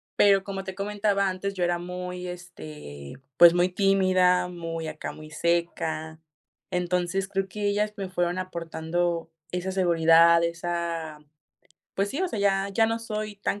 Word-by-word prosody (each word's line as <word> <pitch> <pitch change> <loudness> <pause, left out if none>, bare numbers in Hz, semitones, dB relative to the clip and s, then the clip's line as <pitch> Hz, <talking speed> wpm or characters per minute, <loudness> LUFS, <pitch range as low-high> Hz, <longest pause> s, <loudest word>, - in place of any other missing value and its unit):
Pero, 195 -1 +5
como 195 -1 -5
te 190 -1 -7
comentaba 200 -1 0
antes, 195 +2 -3
yo 180 - -1
era 175 0 +1
muy, 180 +1 -6
este, 155 - -9 0.2
pues, 170 0 +9
muy 180 +1 +3
tímida, 185 -2 +3
muy 165 -2 -5
acá, 155 0 -5
muy 155 0 -12
seca. 160 -1 -1 0.5
Entonces, 180 +1 0
creo 195 -1 -2
que 205 +1 -5
ellas 210 +1 +1
me 195 -2 -4
fueron 175 0 -1
aportando 170 -1 -2 0.2
esa 180 +1 -2
seguridad, 170 -2 +5
esa, 170 -2 -3 0.8
pues 200 +1 0
sí, 300 +7 -2
o 375 - 0
sea, 220 - -4
ya 195 -1 +2
ya 225 +3 +3
no 225 0 -1
soy 215 -2 -5
tan 200 0 -2
180 Hz, 155 wpm, -26 LUFS, 170-195 Hz, 0.8 s, pues